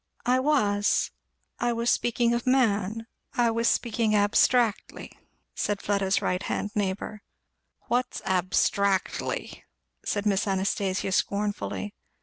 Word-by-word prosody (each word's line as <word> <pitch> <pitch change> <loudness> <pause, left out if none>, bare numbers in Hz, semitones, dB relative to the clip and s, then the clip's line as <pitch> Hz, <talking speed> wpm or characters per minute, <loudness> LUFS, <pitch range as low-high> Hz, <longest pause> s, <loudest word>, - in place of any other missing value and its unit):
"I 250 +1 +3
was 210 -8 +2 0.5
I 240 - +1
was 235 +1 +1
speaking 235 0 +1
of 235 +1 -2
man 225 -4 +1 0.3
I 240 -2 +3
was 230 +1 0
speaking 225 -3 +1
abstractly," 210 +2 +2 0.4
said 205 -1 -1
Fleda's 200 -1 0
right 180 0 0
hand 205 - -3
neighbour. 205 0 -3 0.6
"What's 250 +1 -1
abstractly?" 190 +1 0 0.4
said 205 - -2
Miss 200 -1 +1
Anastasia 195 0 -1
scornfully. 205 +1 -1
210 Hz, 110 wpm, -26 LUFS, 200-235 Hz, 0.6 s, I